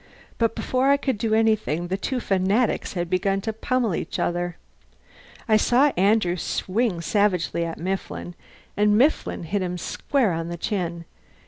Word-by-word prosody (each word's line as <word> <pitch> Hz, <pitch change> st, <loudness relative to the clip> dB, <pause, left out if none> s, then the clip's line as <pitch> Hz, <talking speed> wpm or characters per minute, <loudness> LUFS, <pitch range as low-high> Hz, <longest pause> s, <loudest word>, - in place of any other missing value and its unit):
But 230 Hz, -1 st, +1 dB
before 260 Hz, +2 st, +1 dB
I 280 Hz, -, +5 dB
could 265 Hz, -6 st, -2 dB
do 220 Hz, -1 st, +1 dB
anything 215 Hz, -7 st, +1 dB
the 190 Hz, -, 0 dB
two 250 Hz, +6 st, -2 dB
fanatics 200 Hz, +3 st, +1 dB
had 175 Hz, -2 st, -2 dB
begun 195 Hz, +2 st, +1 dB
to 220 Hz, +2 st, -3 dB
pummel 235 Hz, -1 st, 0 dB
each 160 Hz, -, -3 dB
other. 175 Hz, 0 st, -1 dB, 0.9 s
I 215 Hz, -1 st, +5 dB
saw 255 Hz, +6 st, +4 dB
Andrew 190 Hz, -1 st, +2 dB
swing 190 Hz, +2 st, -1 dB
savagely 180 Hz, -2 st, +1 dB
at 165 Hz, -, -5 dB
Mifflin, 185 Hz, 0 st, -4 dB, 0.4 s
and 210 Hz, 0 st, +3 dB
Mifflin 275 Hz, -, +1 dB
hit 195 Hz, +5 st, -2 dB
him 180 Hz, -1 st, -2 dB
square 245 Hz, -, 0 dB
on 165 Hz, 0 st, -3 dB
the 170 Hz, 0 st, -5 dB
chin. 170 Hz, -3 st, -3 dB
195 Hz, 155 wpm, -24 LUFS, 175-225 Hz, 0.9 s, I